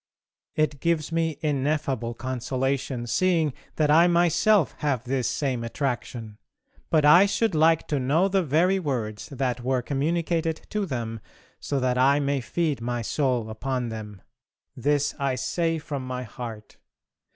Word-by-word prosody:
It 155 Hz, -2 st, 0 dB
gives 165 Hz, -1 st, 0 dB
me 165 Hz, -2 st, 0 dB
ineffable 140 Hz, -5 st, -1 dB
consolation, 130 Hz, 0 st, -2 dB
seeing 165 Hz, +2 st, +1 dB, 0.2 s
that 150 Hz, -2 st, +2 dB
I 165 Hz, +3 st, +6 dB
myself 175 Hz, +2 st, +3 dB
have 135 Hz, -6 st, 0 dB
this 130 Hz, -1 st, -1 dB
same 130 Hz, -5 st, -1 dB
attraction, 115 Hz, -3 st, -4 dB, 0.5 s
but 155 Hz, -2 st, +3 dB
I 170 Hz, +7 st, +8 dB
should 220 Hz, +1 st, 0 dB
like 160 Hz, +1 st, +3 dB
to 145 Hz, -, +1 dB
know 150 Hz, +9 st, +2 dB
the 195 Hz, 0 st, +2 dB
very 175 Hz, +5 st, +2 dB
words 120 Hz, -, -3 dB
that 125 Hz, -3 st, -2 dB
were 130 Hz, 0 st, 0 dB
communicated 160 Hz, +3 st, -1 dB
to 210 Hz, -2 st, -1 dB
them 115 Hz, -5 st, -4 dB, 0.4 s
so 140 Hz, -, -2 dB
that 125 Hz, 0 st, +1 dB
I 140 Hz, +3 st, +4 dB
may 140 Hz, -1 st, 0 dB
feed 150 Hz, 0 st, -1 dB
my 120 Hz, 0 st, -2 dB
soul 125 Hz, -2 st, 0 dB
upon 125 Hz, +2 st, -3 dB
them. 105 Hz, -3 st, -8 dB, 0.5 s
This 145 Hz, +1 st, +1 dB
I 135 Hz, -2 st, 0 dB
say 165 Hz, +6 st, -1 dB
from 140 Hz, -4 st, -5 dB
my 125 Hz, 0 st, -4 dB
heart. 110 Hz, -2 st, -8 dB
140 Hz, 145 wpm, -25 LUFS, 125-160 Hz, 0.5 s, I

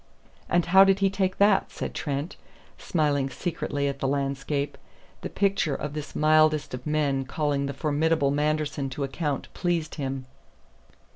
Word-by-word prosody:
"And 175 Hz, -1 st, +2 dB
how 190 Hz, +2 st, +7 dB
did 195 Hz, 0 st, +4 dB
he 195 Hz, -1 st, +2 dB
take 190 Hz, -1 st, -1 dB
that?" 200 Hz, -1 st, +3 dB
said -, -, -5 dB
Trent, 145 Hz, +2 st, -3 dB, 0.4 s
smiling 145 Hz, -5 st, 0 dB
secretly 145 Hz, -1 st, -2 dB
at 140 Hz, 0 st, -3 dB
the 135 Hz, -, 0 dB
landscape. 140 Hz, +1 st, -1 dB, 0.5 s
The -, -, -4 dB
picture 195 Hz, -7 st, +1 dB
of 150 Hz, -1 st, -5 dB
this 150 Hz, -1 st, -6 dB
mildest 155 Hz, -1 st, +3 dB
of 125 Hz, +3 st, -6 dB
men 145 Hz, -3 st, +1 dB
calling 140 Hz, 0 st, -1 dB
the 140 Hz, -, -4 dB
formidable 150 Hz, 0 st, +1 dB
Manderson 150 Hz, -1 st, -1 dB
to 135 Hz, +2 st, -4 dB
account 140 Hz, +1 st, -2 dB
pleased 170 Hz, -3 st, -1 dB
him. 135 Hz, -1 st, -3 dB
150 Hz, 150 wpm, -26 LUFS, 140-165 Hz, 0.5 s, how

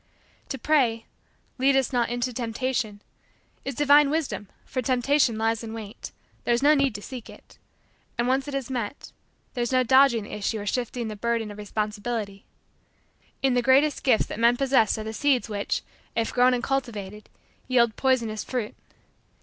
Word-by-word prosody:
To 270 Hz, -, -3 dB
pray: 240 Hz, -5 st, +1 dB, 0.5 s
"Lead 270 Hz, +1 st, +4 dB
us 265 Hz, -1 st, +1 dB
not 240 Hz, -1 st, +1 dB
into 245 Hz, +1 st, -2 dB
temptation," 225 Hz, -3 st, -2 dB, 0.6 s
is 275 Hz, -1 st, -4 dB
divine 290 Hz, +1 st, +5 dB
wisdom 300 Hz, -9 st, -2 dB, 0.2 s
for 255 Hz, -, -3 dB
Temptation 255 Hz, -1 st, +2 dB
lies 225 Hz, +1 st, 0 dB
in 225 Hz, 0 st, -6 dB
wait. 215 Hz, -2 st, -8 dB, 0.3 s
There 240 Hz, -, +2 dB
is 240 Hz, -, -2 dB
no 295 Hz, +1 st, +6 dB
need 275 Hz, -5 st, +2 dB
to 205 Hz, -, -7 dB
seek 255 Hz, -4 st, -8 dB
it. -, -, -16 dB, 0.6 s
And, 235 Hz, -, +1 dB
when 260 Hz, +1 st, +3 dB
once 275 Hz, -, -11 dB
it 285 Hz, -, -4 dB
is 270 Hz, -1 st, -3 dB
met, 245 Hz, 0 st, -4 dB, 0.4 s
there 245 Hz, -, -3 dB
is 240 Hz, -, -1 dB
no 255 Hz, 0 st, +3 dB
dodging 260 Hz, -2 st, +5 dB
the -, -, -10 dB
issue 210 Hz, +1 st, -2 dB
or 205 Hz, -, -6 dB
shifting 240 Hz, +1 st, -2 dB
the 215 Hz, -, -5 dB
burden 230 Hz, 0 st, -1 dB
of 205 Hz, -, -10 dB
responsibility. 210 Hz, 0 st, -4 dB, 1.0 s
In 265 Hz, -2 st, +3 dB
the 245 Hz, -, +2 dB
greatest 270 Hz, +4 st, +3 dB
gifts 250 Hz, -5 st, +3 dB
that -, -, -7 dB
men 235 Hz, +1 st, +4 dB
possess 260 Hz, -6 st, +3 dB
are 215 Hz, -, -4 dB
the 220 Hz, 0 st, -5 dB
seeds 260 Hz, -1 st, +1 dB
which, 205 Hz, -1 st, -2 dB, 0.3 s
if 230 Hz, -1 st, -1 dB
grown 250 Hz, 0 st, +4 dB
and 240 Hz, -, -3 dB
cultivated, 215 Hz, -7 st, -3 dB, 0.4 s
yield 235 Hz, -4 st, +3 dB
poisonous 235 Hz, -5 st, 0 dB
fruit. 240 Hz, -5 st, -3 dB
240 Hz, 180 wpm, -25 LUFS, 220-265 Hz, 1.0 s, no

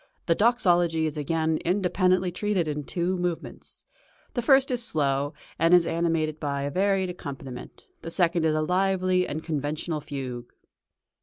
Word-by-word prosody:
The 170 Hz, -, +3 dB
Doxology 175 Hz, -7 st, +2 dB
is 155 Hz, -1 st, -2 dB
again 160 Hz, +1 st, 0 dB
independently 185 Hz, 0 st, +1 dB
treated 190 Hz, -2 st, -1 dB
in 150 Hz, -1 st, -3 dB
two 175 Hz, +4 st, -1 dB
movements. 175 Hz, -2 st, -5 dB, 0.5 s
The 245 Hz, -, -1 dB
first 270 Hz, +2 st, +4 dB
is 245 Hz, -1 st, +1 dB
slow, 145 Hz, -, 0 dB, 0.2 s
and 165 Hz, +2 st, +5 dB
is 175 Hz, -1 st, +5 dB
animated 165 Hz, -2 st, 0 dB
by 140 Hz, -2 st, -2 dB
a 140 Hz, -, -2 dB
varied 190 Hz, +1 st, +1 dB
accompaniment; 135 Hz, -6 st, -9 dB, 0.2 s
the 165 Hz, -, -6 dB
second 170 Hz, -1 st, +1 dB
is 155 Hz, -1 st, +2 dB
a 155 Hz, -, +1 dB
lively 185 Hz, +1 st, +1 dB
and 155 Hz, +2 st, -5 dB
conventional 155 Hz, +1 st, -3 dB
fugue. 130 Hz, -4 st, -6 dB
165 Hz, 150 wpm, -26 LUFS, 150-185 Hz, 0.5 s, and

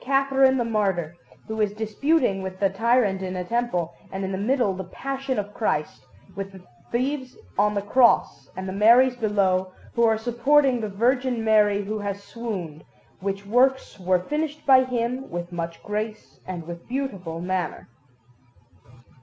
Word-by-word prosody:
Catherine 270 Hz, 0 st, +3 dB
the 240 Hz, -, 0 dB
martyr, 195 Hz, -7 st, 0 dB, 0.3 s
who 220 Hz, 0 st, -2 dB
is 205 Hz, -1 st, +1 dB
disputing 220 Hz, +1 st, +1 dB
with 190 Hz, 0 st, -6 dB
the 195 Hz, -1 st, +2 dB
tyrant 220 Hz, -2 st, +2 dB
in 185 Hz, -1 st, -4 dB
a 180 Hz, -, -2 dB
temple, 180 Hz, -6 st, -1 dB, 0.2 s
and, 190 Hz, 0 st, -3 dB
in 190 Hz, -, -3 dB
the 190 Hz, -, -2 dB
middle, 240 Hz, -1 st, +1 dB
the 190 Hz, 0 st, -5 dB
Passion 270 Hz, +6 st, -4 dB
of 205 Hz, 0 st, -3 dB
Christ, 155 Hz, -9 st, -2 dB, 0.3 s
with 195 Hz, 0 st, -5 dB
the 190 Hz, -1 st, -13 dB, 0.3 s
Thieves 260 Hz, +1 st, -2 dB, 0.2 s
on 210 Hz, +1 st, +2 dB
the 200 Hz, -, -1 dB
Cross, 235 Hz, +3 st, +3 dB
and 190 Hz, 0 st, -4 dB
the 190 Hz, -, -4 dB
Maries 240 Hz, +5 st, +5 dB
below, 190 Hz, -5 st, +1 dB, 0.2 s
who 235 Hz, -, +2 dB
are 225 Hz, -1 st, +4 dB
supporting 250 Hz, +3 st, +2 dB
the 215 Hz, -, -3 dB
Virgin 245 Hz, +3 st, +1 dB
Mary 210 Hz, -2 st, +4 dB
who 215 Hz, +1 st, -3 dB
has 200 Hz, -1 st, -4 dB
swooned; 195 Hz, -10 st, -6 dB, 0.4 s
which 195 Hz, +1 st, -3 dB
works 250 Hz, +1 st, +2 dB
were 185 Hz, 0 st, +2 dB
finished 300 Hz, +4 st, -3 dB
by 260 Hz, -1 st, +7 dB
him 250 Hz, +2 st, -2 dB
with 175 Hz, 0 st, -5 dB
much 170 Hz, -1 st, -5 dB
grace 215 Hz, +1 st, -5 dB
and 175 Hz, -3 st, -5 dB
with 170 Hz, 0 st, -9 dB
beautiful 195 Hz, -11 st, -3 dB
manner. 180 Hz, -1 st, -3 dB
210 Hz, 160 wpm, -24 LUFS, 190-250 Hz, 0.4 s, by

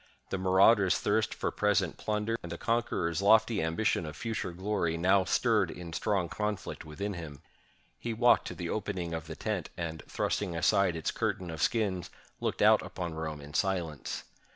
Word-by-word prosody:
The 95 Hz, -, -1 dB
marauder's 95 Hz, +1 st, +5 dB
thirst 105 Hz, 0 st, +1 dB
for -, -, -2 dB
present 105 Hz, -4 st, +1 dB
plunder, 105 Hz, +1 st, -1 dB
and 85 Hz, -, -8 dB
the 85 Hz, -, -4 dB
conqueror's 100 Hz, -7 st, 0 dB
lofty 110 Hz, +1 st, +5 dB
ambition 85 Hz, +3 st, +1 dB
of 75 Hz, -, -7 dB
future 110 Hz, 0 st, -3 dB
glory, 95 Hz, -2 st, -1 dB
now 95 Hz, +2 st, +4 dB
stirred -, -, +2 dB
in 85 Hz, -2 st, -8 dB
strong 95 Hz, -1 st, 0 dB
conflict 105 Hz, +3 st, -3 dB
within 100 Hz, +7 st, -4 dB
him. 75 Hz, -6 st, -8 dB, 0.6 s
He 120 Hz, -, -3 dB
walked 120 Hz, +2 st, +4 dB
to -, -, -6 dB
the 85 Hz, -2 st, -4 dB
opening 95 Hz, -5 st, -3 dB
of 80 Hz, -1 st, -4 dB
the 80 Hz, -, -6 dB
tent, 105 Hz, -5 st, -3 dB
and, 80 Hz, -2 st, -4 dB
thrusting 95 Hz, -5 st, -1 dB
aside 85 Hz, +2 st, +3 dB
its 80 Hz, -, -1 dB
curtain 90 Hz, -2 st, -2 dB
of 80 Hz, -1 st, -6 dB
skins, 100 Hz, -5 st, 0 dB, 0.3 s
looked -, -, -1 dB
out -, -, +6 dB
upon 85 Hz, -3 st, -5 dB
Rome 80 Hz, -2 st, -4 dB
in 75 Hz, +1 st, -11 dB
silence. 85 Hz, -6 st, -1 dB
95 Hz, 175 wpm, -30 LUFS, 85-105 Hz, 0.6 s, out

